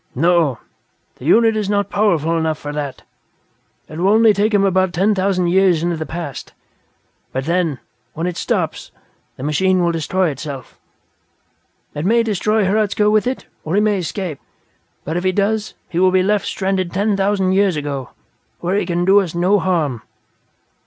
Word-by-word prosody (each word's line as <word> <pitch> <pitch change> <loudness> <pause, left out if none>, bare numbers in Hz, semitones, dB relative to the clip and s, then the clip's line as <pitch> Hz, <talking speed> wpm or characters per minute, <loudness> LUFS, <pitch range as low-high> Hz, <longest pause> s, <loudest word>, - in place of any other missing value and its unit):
"No, 165 -3 +2 0.6
the 125 - -11
unit 225 +6 +4
is 210 -2 -2
not 205 -1 0
powerful 170 -6 +1
enough 160 -1 0
for 145 - -6
that. 145 -2 -5 0.8
It 155 - -8
will 185 +3 +2
only 220 0 +5
take 205 +3 +1
him 205 -2 +3
about 185 -1 +1
ten 195 +5 +2
thousand 190 -2 0
years 180 -3 +3
into 175 0 0
the 160 -1 -5
past. 160 -5 -6 0.8
But 130 +1 -3
then, 170 -3 0 0.4
when 165 - -3
it 180 -1 -2
stops, - - -2 0.5
the 130 - -8
machine 180 +5 +2
will 170 - +2
destroy 170 +3 0
itself. 140 -1 -8 1.1
It 150 - -4
may 230 +5 +3
destroy 215 0 +1
Hradzka 210 +1 +1
with 215 +2 +2
it 260 - -3 0.2
or 160 +4 -2
he - - +4
may 210 -2 +1
escape. 175 -3 -4 0.7
But 160 +3 -2
if 175 - -2
he 185 - +2
does, 210 +3 -1
he 170 - -3
will 185 0 +5
be 185 0 +2
left 205 +1 0
stranded 190 -2 -1
ten 200 +3 0
thousand 195 -1 +1
years 195 -2 +2
ago, 140 -4 -4 0.5
when 185 +4 0
he - - -3
can 175 0 0
do 195 +2 +6
us 180 -4 -3
no 185 +4 +3
harm. 155 -11 -1
185 Hz, 175 wpm, -18 LUFS, 165-200 Hz, 1.1 s, do